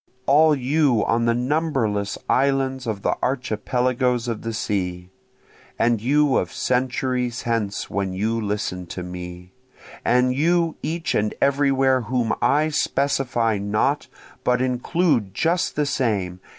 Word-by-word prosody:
All 150 +2 +5
you 135 -4 +2
on 115 +1 +1
the 115 0 +2
numberless 125 -7 0
islands 135 -1 +1
of 105 -3 -3
the - - +1
archipelagoes 125 0 0
of 115 -3 -3
the 115 - -4
sea! 90 -4 -3 0.7
And 115 -2 +2
you 145 +3 +3
of - - -1
centuries 125 -1 -1
hence 115 -4 -2
when 100 -1 -2
you 110 +5 -1
listen 100 -4 -3
to 90 +2 -6
me! 90 0 -8 0.5
And 125 +1 +3
you 165 +3 +1
each 165 +3 -2
and 105 0 0
everywhere 135 -2 +3
whom 115 -1 -1
I 150 +2 +3
specify 135 -7 0
not, 100 +1 0 0.4
but 125 0 +2
include 125 - 0
just 170 - 0
the 150 - +1
same! 100 -10 -1
125 Hz, 130 wpm, -22 LUFS, 105-135 Hz, 0.7 s, All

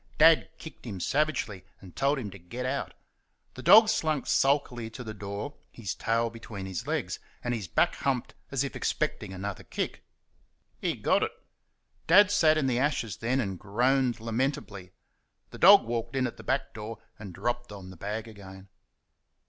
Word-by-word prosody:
Dad 160 +1 +6
kicked 160 - -11
him 100 -5 -5
savagely 130 - 0 0.2
and 90 -3 -14
told 140 +2 +2
him 110 -7 -5
to 100 - -11
get 120 +9 -6
out. 135 +2 -3 0.6
The 130 - -9
dog 210 - +8
slunk 155 -9 0
sulkily 135 -5 +1
to 125 +3 -8
the 110 -2 -6
door, 100 +6 -5 0.2
his 105 -7 -5
tail 115 0 0
between 110 -4 -8
his 95 -2 -5
legs, - - -2 0.2
and 120 - -1
his 110 -6 -4
back - - +2
humped 130 -3 -2 0.2
as 135 -1 0
if 140 - -5
expecting - - -2
another 95 +1 -5
kick. - - -4 0.8
He - - -1
got - - +2
it. - - 0 0.8
Dad 195 +4 +7
sat 155 -6 +4
in 155 - +1
the 125 -2 +1
ashes 130 - 0
then, 125 +4 0
and 95 -7 -2
groaned 125 +4 +1
lamentably. 115 -5 -3 0.6
The - - -10
dog 200 +3 +9
walked 115 +3 -3
in 130 -1 +2
at 120 - -4
the - - -11
back - - -1
door 110 +1 -6 0.2
and 105 -3 -8
dropped 120 +5 -3
on 95 -2 -9
the - - -11
bag 105 +6 -4
again. 95 -3 -12
115 Hz, 175 wpm, -28 LUFS, 100-135 Hz, 0.8 s, dog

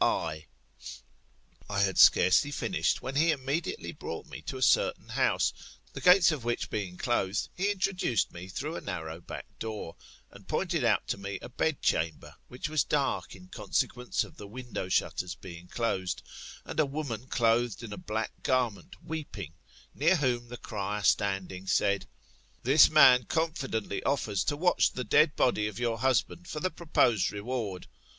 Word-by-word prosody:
I 75 0 0 1.2
had 100 -2 +1
scarcely 115 +10 +6
finished, 180 +5 -1
when 130 - -4
he 160 +4 +4
immediately 155 - -2
brought - - -7
me - - -9
to - - -6
a - - -8
certain - - +2
house, - - +1 0.4
the - - -7
gates 180 -2 +7
of 150 -6 -4
which 120 0 -2
being 95 -4 -3
closed, 100 -5 0
he 195 +3 0
introduced 185 - 0
me 85 +1 -8
through 145 - -4
a - - -5
narrow 80 -3 -5
back - - -8
door, 110 -7 -5 0.4
and - - -15
pointed - - -1
out - - +2
to - - -1
tne 100 0 -5
a - - -7
bedr 145 +4 -1
chamber, 80 -1 0
which 125 +4 -5
was 155 -2 +1
dark 140 -2 -1
in 90 0 -15
consequence 125 +5 -1
of - - -13
the 105 - -9
window 115 -4 -6
shutters 90 -1 0
being 90 -1 -11
closed, 95 -4 -2 0.4
and - - -5
a 155 - +5
woman 135 -5 -4
clothed 120 -1 +1
in 110 -3 -6
a - - -7
black 110 +1 -3
garment 120 -8 -1
weeping; 140 - -6 0.4
near 165 +6 +3
whom 125 -6 0
the 120 +1 -8
cryer 105 -2 -4
standing, 95 -2 0
said. 100 +1 +1 0.6
This 135 +5 +7
man 130 -6 +7
confidently 140 -11 -2
offers 110 -8 0
to 145 - 0
watch 180 +3 +3
the 125 - -3
dead 150 +6 +4
body 105 -4 +2
of 105 - -7
your 115 -2 -1
husband 130 +7 0
for 155 - -4
the 185 +3 -1
proposed 150 - +2
reward. 105 -3 -4
120 Hz, 165 wpm, -29 LUFS, 100-145 Hz, 1.2 s, gates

